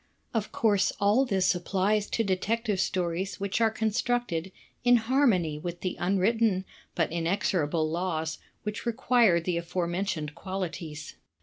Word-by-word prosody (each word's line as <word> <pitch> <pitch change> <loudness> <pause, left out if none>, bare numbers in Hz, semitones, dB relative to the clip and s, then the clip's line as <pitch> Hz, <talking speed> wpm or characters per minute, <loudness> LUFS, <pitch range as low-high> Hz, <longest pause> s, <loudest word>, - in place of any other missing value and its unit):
Of 220 -3 -1
course 205 -4 +2
all 210 +7 +4
this 190 -6 +2
applies 195 +4 0
to 225 - 0
Detective 205 +2 0
Stories 185 +1 -1
which 200 +3 -1
are 225 - +5
constructed 220 -5 -1 0.3
in 245 0 +6
harmony 220 - +2
with 175 +2 -6
the 185 - -2
imwritten 195 +2 +2 0.3
but 165 -3 +1
inexorable 170 -2 0
laws 160 -1 -2 0.2
which 210 +2 -4
require 235 -6 +3
the 170 +1 -1
aforementioned 170 -2 -2
qualities. 170 -4 -5
190 Hz, 125 wpm, -28 LUFS, 170-220 Hz, 0.3 s, in